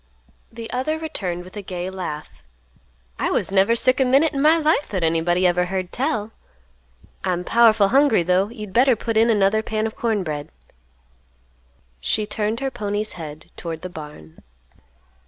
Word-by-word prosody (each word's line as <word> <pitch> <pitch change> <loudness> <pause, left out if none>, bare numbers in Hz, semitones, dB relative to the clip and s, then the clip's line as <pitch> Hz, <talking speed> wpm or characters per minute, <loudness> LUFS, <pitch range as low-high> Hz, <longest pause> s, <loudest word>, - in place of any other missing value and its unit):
The 230 0 -7
other 265 +5 -1
returned 185 - -4
with 185 +3 -14
a 205 - -5
gay 180 -2 -5
laugh, 170 -5 -5 0.9
"I - - 0
was - - 0
never 195 +4 +4
sick 255 +3 +2
a - - +5
minute 275 +5 +3
in 275 - -1
my 310 +3 +5
life 310 -2 +1
that 185 -4 -2
anybody 165 +3 +1
ever 180 0 +3
heard 185 0 -3
tell. 225 -5 -2 0.9
I'm 180 -2 -1
powerful 220 -2 +4
hungry, 265 -7 +4
though. 185 +3 +2
You'd 210 -4 -9
better 255 +2 +5
put 225 +1 -3
in 225 +2 +4
another 210 0 +3
pan 220 0 -2
of 225 - -4
corn 220 -4 0
bread." 150 -2 -5 1.5
She 210 - 0
turned 215 +2 -2
her 270 -1 -1
pony's 210 -2 -3
head 155 -2 -9
toward 165 -1 -6
the 185 - -5
barn. 155 -1 -11
210 Hz, 165 wpm, -22 LUFS, 180-235 Hz, 1.5 s, a